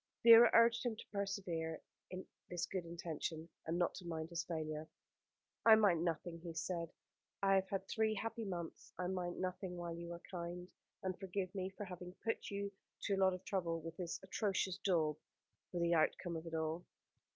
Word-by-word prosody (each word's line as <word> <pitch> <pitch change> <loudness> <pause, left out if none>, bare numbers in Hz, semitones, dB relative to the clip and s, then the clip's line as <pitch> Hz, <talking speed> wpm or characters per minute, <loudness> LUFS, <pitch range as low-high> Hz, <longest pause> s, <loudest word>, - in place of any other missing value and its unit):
Vera 230 0 +11
urged 230 0 +6
him 240 -3 0
to - - -9
persevere 190 -6 -2 0.3
in 185 +1 -5 0.2
this 175 0 -1
good 185 -3 -3
intention, 165 -1 -4 0.2
and 165 +2 0
not 175 - +2
to - - -8
mind 160 -1 -3
his 170 0 -1
failure. 155 -2 -3 0.7
"I 225 -1 +10
mind 195 -7 +4
nothing," 165 0 -1
he 165 -1 -7
said. 170 0 -2 0.5
"I 195 0 +5
have 190 0 +3
had 195 -1 -2
three 220 -1 +2
happy 225 +2 -3
months. 175 -5 -5
I 180 - -1
mind 180 -1 -2
nothing 185 0 -3
while 170 -1 -3
you 170 0 -6
are 170 - -8
kind, 175 0 -4 0.4
and 185 -2 -2
forgive 190 -1 -2
me 190 -1 -2
for 205 - -3
having 180 -1 -7
put 225 - -1
you 200 0 -2 0.3
to 200 - +1
a - - +2
lot 190 -1 +4
of 185 - -11
trouble, 170 -4 0
with 165 0 -7
this 175 -2 -3
atrocious 190 -1 0
daub 160 -6 +3 0.5
for 175 - -2
the 170 0 +3
outcome 170 +2 +2
of 165 +1 -5
it 165 - -4
all." 160 +2 -1
180 Hz, 190 wpm, -38 LUFS, 165-195 Hz, 0.7 s, Vera